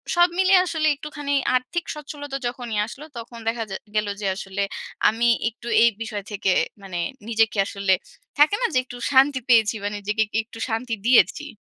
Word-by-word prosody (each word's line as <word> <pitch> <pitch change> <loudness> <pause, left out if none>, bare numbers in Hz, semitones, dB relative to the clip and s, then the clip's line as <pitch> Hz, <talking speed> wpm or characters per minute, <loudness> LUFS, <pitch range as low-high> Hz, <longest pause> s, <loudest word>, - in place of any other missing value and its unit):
সব 350 0 +5
মিলিয়ে 375 0 +6
আসলে 315 -2 0
একটুখানি 290 0 -5 0.2
আর্থিক 255 +7 -1
সচ্ছলতা 290 -2 -6
যখনই 240 -3 -4
আসলো 285 +5 -9
তখন 235 0 -8
দেখা 225 0 0
যা 190 - -3 0.2
গেলো 210 -1 +1
যে 200 - -1
আসলে 195 +1 -3 0.5
আমি 230 +2 +1 0.2
একটু 235 +1 -13 0.2
এই 235 - +7
বিষয় 215 -3 -4
থেকে 195 -2 0 0.3
মানে 185 -3 -5 0.3
নিজেকে 225 -1 +2
আসলে, 200 -1 +1 0.5
থাকে 305 +7 +6
না? - - +3
যে - - +2
একটু 245 - -9
শান্তি 270 0 +5
পেয়েছি 225 -2 +5
বা 205 - 0
নিজেকে 210 +2 0 0.2
একটু 230 +1 -14
শান্তি 225 +1 -2
দিয়েছি। 260 +4 +4
235 Hz, 170 wpm, -23 LUFS, 215-285 Hz, 0.5 s, এই